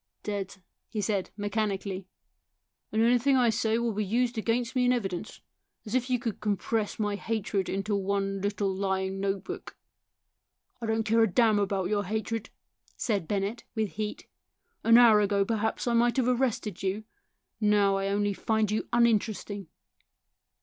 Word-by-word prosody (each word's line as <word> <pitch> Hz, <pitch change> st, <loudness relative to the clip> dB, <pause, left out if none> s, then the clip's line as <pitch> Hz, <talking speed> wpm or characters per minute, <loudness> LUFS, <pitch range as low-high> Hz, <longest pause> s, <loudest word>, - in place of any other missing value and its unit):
" -, -, -52 dB
Dead 200 Hz, -2 st, -3 dB
1 190 Hz, -, -29 dB
" -, -, -56 dB
he 220 Hz, -, -4 dB
said 200 Hz, -1 st, -1 dB
mechanically. 200 Hz, -2 st, -2 dB, 0.4 s
" -, -, -56 dB
And 220 Hz, +1 st, +2 dB
anything 245 Hz, +3 st, +4 dB
I 240 Hz, -3 st, +4 dB
say 225 Hz, -1 st, +1 dB
will 235 Hz, -1 st, 0 dB
be 210 Hz, +1 st, -1 dB
used 240 Hz, +4 st, 0 dB
against 235 Hz, +3 st, -1 dB
me 250 Hz, -1 st, +3 dB
in 245 Hz, -, +4 dB
evidence! 210 Hz, -3 st, -3 dB, 0.4 s
As 215 Hz, -, -6 dB
if 255 Hz, 0 st, +1 dB
you 250 Hz, -, +3 dB
could 230 Hz, -3 st, -4 dB
compress 210 Hz, +1 st, -1 dB
my 210 Hz, -1 st, 0 dB
hatred 200 Hz, -1 st, -2 dB
into 195 Hz, +2 st, -1 dB
one 195 Hz, 0 st, -1 dB
little 200 Hz, -1 st, -1 dB
lying 190 Hz, 0 st, -1 dB
notebook." 195 Hz, -1 st, -4 dB, 0.5 s
" 250 Hz, -, -49 dB
I 230 Hz, -, -3 dB
don't 220 Hz, 0 st, +1 dB
care 225 Hz, +2 st, +3 dB
a 225 Hz, -, +4 dB
damn 220 Hz, -1 st, +4 dB
about 195 Hz, -2 st, 0 dB
your 205 Hz, -1 st, 0 dB
hatred," 220 Hz, +2 st, -3 dB, 0.5 s
said 200 Hz, -8 st, -1 dB
Bennett, 205 Hz, +3 st, -2 dB
with 220 Hz, -2 st, 0 dB
heat. 210 Hz, 0 st, -4 dB, 0.3 s
" -, -, -48 dB
An 230 Hz, +1 st, +7 dB
hour 225 Hz, -3 st, +7 dB
ago, 200 Hz, -1 st, +2 dB
perhaps, 220 Hz, 0 st, -1 dB
I 240 Hz, -, +2 dB
might 240 Hz, +2 st, +3 dB
have 255 Hz, -2 st, +2 dB
arrested 240 Hz, -6 st, 0 dB
you; 195 Hz, +3 st, -1 dB, 0.6 s
now 205 Hz, -2 st, +3 dB
I 195 Hz, 0 st, -1 dB
only 205 Hz, 0 st, +1 dB
find 220 Hz, +1 st, 0 dB
you 215 Hz, -, -2 dB
uninteresting." 215 Hz, -4 st, +1 dB
210 Hz, 175 wpm, -28 LUFS, 200-230 Hz, 0.6 s, An